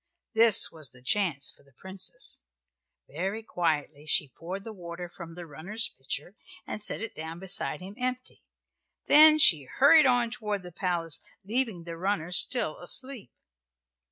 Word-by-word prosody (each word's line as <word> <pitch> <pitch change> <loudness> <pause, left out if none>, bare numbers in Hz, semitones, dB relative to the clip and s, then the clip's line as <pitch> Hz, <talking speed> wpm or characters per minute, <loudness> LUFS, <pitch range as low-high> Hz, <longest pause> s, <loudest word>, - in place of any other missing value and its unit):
This 225 -2 +6
was 155 -5 -7
the 125 - -20
chance 170 -6 0
for - - -23
the 140 -1 -27
Princess. 190 - -6 0.7
Very 200 +4 -5
quietly 155 -6 -3
she 145 -2 0
poured 185 +4 -7
the 225 - -9
water 175 -2 -8
from 170 -1 -11
the 175 -1 -9
runner's 185 +10 -4
pitcher, 140 +6 -7 0.3
and 215 - -6
set 210 - +5
it 225 - -6
down 160 +1 -8
beside 190 0 0
him 190 +2 -9
empty. 255 0 -5 0.6
Then 310 +1 +8
she 165 - +6
hurried 285 - +5
on 245 -2 +2
toward 210 -5 -4
the 180 - -10
palace, 170 -3 -3 0.2
leaving 220 -5 0
the 165 0 -8
runner 180 -2 -2
still 180 -2 +1
asleep. 255 - -3
185 Hz, 155 wpm, -27 LUFS, 165-225 Hz, 0.7 s, Then